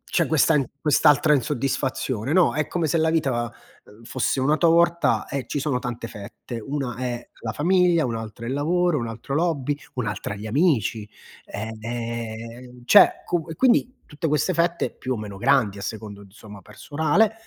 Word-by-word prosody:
c'è 170 - 0
questa 160 +1 +3
in 140 - +2 0.2
quest'altra 150 0 +4
insoddisfazione, 130 -1 -1
no. 175 -9 +4
È 155 +1 0
come 170 -2 -1
se 160 - 0
la 160 0 +2
vita, 130 -8 0 0.3
uhm, 105 +3 -18
fosse 130 +2 -1
una 145 +4 +2
torta 170 +1 +3
e 140 -2 -3
ci - - -3
sono 135 -3 0
tante 120 -2 -5
fette: 110 +4 -8
una 135 -3 -3
è 120 -1 -4
la 110 -2 -4
famiglia, 175 +1 +3
un'altra 115 -1 -6
è - - -4
il 130 - -2
lavoro, 175 +3 +1
un'altra 115 +3 -5
l'hobby, 150 -3 0 0.2
un'altra 105 -4 -3
gli 105 +2 -7
amici. 115 - +1 0.4
Ehm, 115 +2 -6
cioè 205 +6 +8 0.2
co 170 -3 -1
e 160 - -5
quindi 255 - +2
tutte 150 +2 -4
queste 150 +5 +1
fette, 170 +1 0
più 130 0 -3
o - - -4
meno 105 -2 -7
grandi 120 -6 +2
a - - -8
secondo, 105 -2 -6
insomma, 105 0 -13
personale, 155 - 0
130 Hz, 170 wpm, -23 LUFS, 115-160 Hz, 0.4 s, cioè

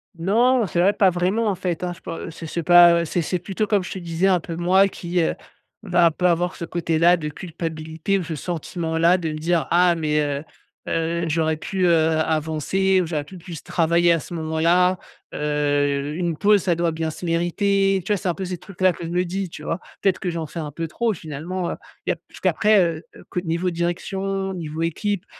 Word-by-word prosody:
Non, 230 +8 +3
c'est 175 - -2
vrai. 195 +3 +4
Pas 200 -2 +4
vraiment 185 +6 0
en 200 - +1
fait, 180 -1 -3
hein 175 - -2
je - - -17
peux 165 - -6
c'est 165 0 -8
c'est 170 +2 -3
pas 175 0 +8
ouais 170 - +1
c'est 170 +2 -1
c'est 180 +3 -2
plutôt 195 +4 -2
comme 200 -3 +2
je - - -7
te 190 - -5
disais 170 +2 0
un 185 -2 +4
peu 165 0 -6
moi 185 +3 +4
qui, 175 -2 -2
heu, - - 0 0.5
va 175 -3 +4
pas 180 +2 +2
avoir 175 +2 -1
ce 170 - -5
côté-là 170 +1 +2
de 155 -2 -4
culpabilité 160 +2 -3
ou 185 - -2
ce 160 -1 -5
sentiment-là 165 +1 0
de 165 -3 -3
me 155 - -5
dire: 165 +1 0
«Ah 175 0 +5
mais, 150 -2 0
heu 145 -1 -2 0.5
heu, 170 +1 -1
j'aurais 160 0 0
pu, 185 +3 -1
heu, 175 - +4 0.3
avancer 160 +5 +1
ou - - -1
j'aurais 150 -3 -2
pu 185 +4 -11
plus 170 -2 -9
travailler 170 0 +2
à 165 - +1
ce - - -9
moment-là, 170 +3 +2 0.4
heu, 145 -1 0
une 170 -2 -2
pause 205 -1 +4
ça 175 -3 +2
doit 170 0 0
bien 160 0 -2
se 175 - -8
mériter» 195 +3 +1
tu 210 - -2
vois? - - +1
C'est 185 - -4
un 175 - +1
peu 190 +1 -5
ces 180 0 -4
trucs-là 185 0 0
que - - -9
je 165 - -5
me 180 +1 +1
dis 185 +3 -3
dit 185 - -6
tu 150 - -10
vois? 165 +3 -2 0.2
Peut-être 195 -2 +2
que 185 - -2
j'en 165 -1 -3
fais 165 - -7
un 150 -2 -5
peu 165 +2 -4
trop 230 +6 -1
finalement, 170 +2 -5
heu, - - -3 0.3
il - - +1
y - - +2
a - - -7
puisqu'après, 215 -1 +2
heu 165 -2 -1
heu, - - -13
co - - -2
niveau 170 +1 -1
direction 190 +3 -2
niveau 160 -2 -5
équipe 175 +4 -1
170 Hz, 230 wpm, -22 LUFS, 160-185 Hz, 0.5 s, pas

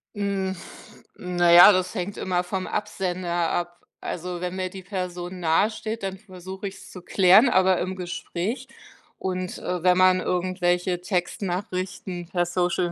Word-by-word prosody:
Hm, 195 -2 -1 0.6
na 175 -1 +1
ja, 175 +4 +10
das 185 -1 0
hängt 195 +1 -4
immer 180 -1 -1
vom 185 +1 -4
Absender 175 -4 -2
ab. 175 0 -2 0.3
Also, 180 0 -5
wenn 180 0 -3
mir 185 -1 -2
die 190 0 -10
Person 180 -1 -5
nahesteht, 215 +6 0
dann 190 0 -3
versuche 190 0 -8
ich's 195 - -11
zu 180 - -10
klären, 195 +7 +5
aber 185 -3 +3
im 185 +1 -3
Gespräch, 185 +7 -4 0.5
und, 185 -1 -3
äh, 180 -1 -3
wenn 180 +1 +4
man 185 0 +5
irgendwelche 180 0 0
Textnachrichten 180 -1 -3
per 175 -2 0
Social 175 0 0
185 Hz, 145 wpm, -25 LUFS, 175-190 Hz, 0.6 s, ja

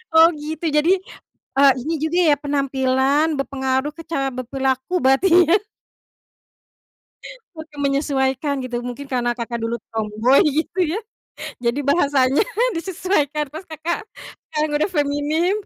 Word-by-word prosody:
Oh, 325 +1 +9
gitu. 315 +2 -5
Jadi, 300 +4 +3 0.7
eee, 275 0 +7
ini 310 +6 -3
juga 315 +4 -1
ya, - - +3
penampilan 275 0 +1
berpengaruh 265 +1 -1
ke 330 - -8
cara 275 -4 -2
berperilaku, 265 +4 -2
berarti 270 +8 +3 0.2
ya. 385 +4 +4 2.0
Oke, 315 -1 -10
menyesuaikan 275 0 0
gitu, 245 -1 -4
mungkin 250 +3 -6
karena 240 -2 0
Kakak 235 0 -4
dulu 230 +1 -1 0.2
tomboi, 220 - +2
gitu, 335 +3 -2
ya. 425 - -1 0.7
Jadi 235 +4 +1
bahasanya 280 -1 +3 0.3
disesuaikan, 325 -4 -1
terus 320 +6 -9
Kakak, 320 +4 -3 0.5
sekarang 305 0 -1
udah 310 - +1
feminim, 295 +5 +1
280 Hz, 125 wpm, -21 LUFS, 265-315 Hz, 2.0 s, Oh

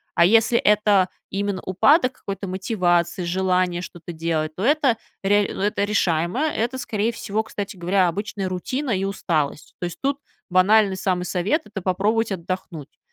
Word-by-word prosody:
А 170 - +6
если 225 +4 +4
это 205 -3 +3 0.2
именно 200 -1 -2
упадок 255 - +3
какой-то 195 -3 -6
мотивации, 185 -2 0
желание 180 0 0
что-то 175 -1 -9
делать, 160 -1 -2
то 190 - -4
это 275 -3 +3 0.3
реа 205 +1 +3 0.2
это 205 -1 0
решаемо. 180 - 0
Это, 260 -5 -1
скорее 230 -2 -1
всего, 220 -1 -2
кстати 205 -3 -6
говоря, 180 +1 +2
обычная 200 +2 -3
рутина 255 +9 -3
и 195 -2 0
усталость. 160 -7 -2
То 175 - -3
есть 175 - -6
тут 280 +1 0 0.3
банальный 195 +1 +4
самый 185 -2 -1
совет- 185 - 0
это 210 -2 -7
попробовать 210 +5 0
отдохнуть. 175 -5 -6
195 Hz, 150 wpm, -23 LUFS, 180-215 Hz, 0.3 s, А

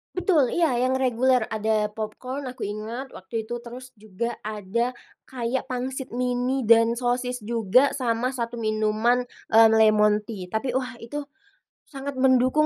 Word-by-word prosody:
Betul. 345 -8 +2
Iya, 340 -1 +3
yang 255 +2 +1
reguler, 255 -1 +2
ada 215 -1 0
popcorn, 225 +6 -6
aku 255 0 -8
ingat 220 +6 -5
waktu 225 +4 -4
itu. 240 - -2
Terus 245 +2 -8
juga 215 +3 -4
ada 215 +4 -2 0.3
kayak 250 0 -3
pangsit 260 +1 -4
mini 250 +2 0
dan 230 0 +6
sosis 245 0 -1
juga, 230 +4 +3
sama 245 -1 0
1 240 -3 -4
minuman, 215 +3 +1 0.2
mmm, 225 0 +7
lemon 215 -1 +4
tea. 210 -3 -7
Tapi 220 +4 -1
wah, 260 -1 -3
itu 235 +5 -6 0.7
sangat 275 -1 -7
mendukung 260 +3 +4
240 Hz, 140 wpm, -25 LUFS, 220-255 Hz, 0.7 s, mmm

